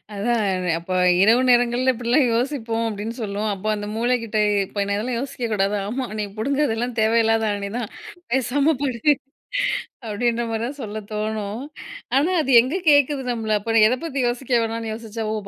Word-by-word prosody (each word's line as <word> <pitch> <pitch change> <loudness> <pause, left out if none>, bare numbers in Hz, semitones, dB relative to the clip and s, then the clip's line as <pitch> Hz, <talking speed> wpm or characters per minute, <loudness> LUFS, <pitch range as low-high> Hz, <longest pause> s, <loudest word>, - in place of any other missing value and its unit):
அதான் 220 +2 0 0.3
அப்ப 170 +2 -13 0.3
இரவு 230 +5 +5
நேரங்கள்ல 245 +1 +3
இப்படிலாம் 245 +4 +2
யோசிப்போம் 230 -3 -1
அப்படின்னு 215 +2 -5
சொல்லுவோம். 210 +1 -2
அப்ப 195 +2 -8
அந்த 205 0 -5
மூளைக்கிட்ட 230 -2 0 0.3
இப்ப 205 - -3
ஏ - - -2
அதெல்லாம் 235 +3 -2
யோசிக்க 255 -3 -4
கூடாது. 200 0 +1
ஆமா, 255 +3 -2
"நீ 210 - -1
புடுங்குறதெல்லாம் 245 -1 0
தேவையில்லாத 225 0 +3
ஆணி 200 0 -3
தான் 225 -4 -4 0.4
பேசாம 275 +4 +2
படு" 265 +1 +2 0.9
அப்படீன்ற 235 +2 0
மாரி 225 0 -2
தான் 285 +3 -7
சொல்ல 215 -1 -5
தோணும். 215 +1 -3 0.5
ஆனா, 305 +7 +3
அது 270 - -1
எங்க 260 +8 -2 0.2
கேட்குது 285 -1 +3
நம்மள 220 -3 0
அப்ப 225 +2 -1
எத 250 - +1
பத்தி 290 -4 -4
யோசிக்க 250 +1 -4
வேணாம்ன்னு 225 -1 -3
யோசிச்சா, 225 0 -6
ஓ! - - -1
230 Hz, 160 wpm, -22 LUFS, 215-255 Hz, 0.9 s, இரவு